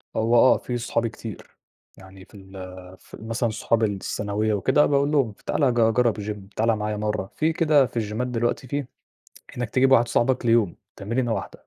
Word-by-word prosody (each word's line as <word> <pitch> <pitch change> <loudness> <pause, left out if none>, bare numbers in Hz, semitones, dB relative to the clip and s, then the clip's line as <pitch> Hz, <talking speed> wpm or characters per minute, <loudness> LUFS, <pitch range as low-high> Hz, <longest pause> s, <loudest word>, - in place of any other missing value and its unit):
هو 115 +2 +2
آه 130 +2 +6
في 125 - -4
صحابي 115 0 -1
كتير، 110 -2 -10 0.4
يعني 95 0 -14
في - - -20
ال 95 -1 -15 0.4
في - - -24
ال 110 - -9
مثلًا 115 +1 -1
صحاب 115 +1 0
الثانوية 105 +1 -1
وكده، 130 +9 +3
باقول 140 0 +1
لهم 135 -7 +2
ف - - -26
تعالَ 135 -4 +1
ج 120 - -5 0.2
جرّب 120 -1 +2
الGym 105 -1 -7
تعالَ 115 +1 +2
معايا 105 0 -3
مرّة، 105 -2 -3
في 160 +1 +1
كده 155 -4 +4
في 120 - -8
الجيمات 110 +3 -2
دلوقتي 120 +2 -2
في 140 +1 -3 0.7
إنّك 120 -2 -3
تجيب 135 +1 +3
واحد 120 -2 +5
صاحبك 125 +1 +1
ليوم 115 -6 +2 0.2
تمرينة 115 +4 -2
واحدة، - - -7
115 Hz, 190 wpm, -24 LUFS, 105-125 Hz, 0.7 s, آه